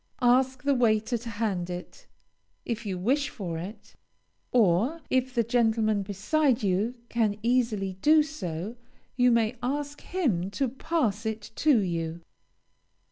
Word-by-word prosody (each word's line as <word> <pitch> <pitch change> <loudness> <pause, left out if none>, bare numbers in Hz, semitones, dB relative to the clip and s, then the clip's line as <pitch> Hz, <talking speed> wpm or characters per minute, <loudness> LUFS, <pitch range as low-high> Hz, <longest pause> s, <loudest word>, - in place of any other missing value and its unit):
Ask 255 +1 +3
the 280 - +3
waiter 225 -2 +2
to 235 0 -5
hand 205 -5 -2
it, 180 0 -8 0.6
if 230 -2 -3
you 190 -2 -2
wish 275 +10 +1
for 175 -7 -5
it; 200 +5 -9 0.6
or, 230 - +3
if 260 0 +1
the 235 - +3
gentleman 225 -2 +2
beside 225 +7 +1
you 200 +5 +1
can 220 -4 0
easily 225 -6 0
do 305 0 +6
so, 215 - -5 0.4
you 250 -1 +4
may 230 0 +2
ask 285 +3 -3
him 230 - -1
to 270 -3 +1
pass 260 - -1
it 220 -1 -5
to 300 -5 +4
you. 170 -4 -2
230 Hz, 135 wpm, -27 LUFS, 200-255 Hz, 0.6 s, do